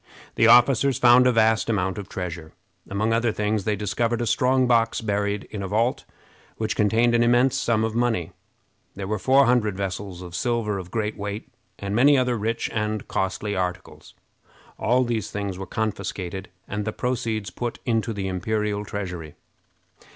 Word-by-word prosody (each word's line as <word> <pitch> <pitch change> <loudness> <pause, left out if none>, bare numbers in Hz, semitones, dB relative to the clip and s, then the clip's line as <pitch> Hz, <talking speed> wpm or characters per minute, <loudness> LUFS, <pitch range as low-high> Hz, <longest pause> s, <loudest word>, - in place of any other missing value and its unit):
The 115 - +4
officers 125 +2 +5
found 125 +1 +6
a - - +5
vast 110 -1 +2
amount 95 -2 0
of 100 - -8
treasure. 85 -4 -6 0.4
Among 110 +3 0
other 115 0 +2
things, 105 -1 -1
they 105 - +1
discovered 115 +4 -1
a 120 - -1
strong 130 +2 +2
box 115 -2 +2
buried 105 -1 -1
in 105 - -5
a 95 - -3
vault, 115 +5 0 0.5
which 110 -1 -2
contained 115 +3 +3
an 120 - +3
immense 120 +3 +3
sum 115 -4 +1
of 110 0 -1
money. 115 -8 0 0.6
There 95 - -5
were 105 +1 -2
four 135 +5 +4
hundred 115 -6 +2
vessels 95 -1 -4
of 90 -1 -10
silver 115 -2 -1
of 90 -1 -8
great 105 +1 -2
weight, 100 +1 -6 0.2
and 100 +1 -4
many 140 +4 +5
other 125 -1 +1
rich 115 +1 -2
and 105 -1 -2
costly 95 +2 -2
articles. 90 -1 -5 0.6
All 125 +3 +2
these 115 -3 -2
things 100 -3 -4
were 95 - -6
confiscated, 100 -2 -4 0.2
and 105 0 -3
the 110 +1 -3
proceeds 110 -5 -2
put 120 +5 -4
into 115 -1 0
the 100 -3 -3
imperial 105 +2 -1
treasury. 90 -7 -6
110 Hz, 170 wpm, -24 LUFS, 100-120 Hz, 0.6 s, found